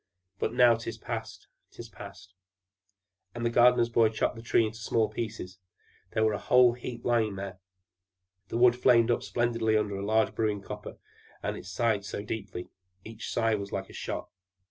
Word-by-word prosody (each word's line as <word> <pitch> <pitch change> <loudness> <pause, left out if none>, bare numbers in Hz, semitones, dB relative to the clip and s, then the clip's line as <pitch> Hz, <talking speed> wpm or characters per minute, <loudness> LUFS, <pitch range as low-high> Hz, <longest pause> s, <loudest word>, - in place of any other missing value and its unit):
But - - 0
now 120 0 +6
'tis 115 0 -5
past, - - -6 0.2
'tis 115 - -10
past!" 95 -2 -12 1.0
And 120 0 -3
the 115 - +1
gardener's 120 0 +5
boy 115 -1 +4
chopped 110 +2 -1
the 115 - -9
Tree 115 0 +2
into 110 +1 -6
small 110 0 +1
pieces; 95 -5 -6 0.5
there 110 - +2
was 110 - +2
a - - -1
whole 125 -1 +6
heap 125 0 -8
lying 115 -4 +1
there. 95 -1 -6 0.9
The 115 - -3
wood 120 0 +6
flamed 120 -1 +4
up - - +1
splendidly 115 -2 +1
under 105 -1 -1
the 100 - -4
large 110 +2 +2
brewing 105 -2 -1
copper, - - -8 0.5
and - - -2
it - - -9
sighed 105 +1 0
so 100 0 -5
deeply! 100 -4 -6 0.3
Each 110 -1 -7
sigh 115 -1 +1
was 100 -2 -3
like 95 0 -4
a - - -14
shot. - - -5
110 Hz, 180 wpm, -29 LUFS, 105-120 Hz, 1.0 s, now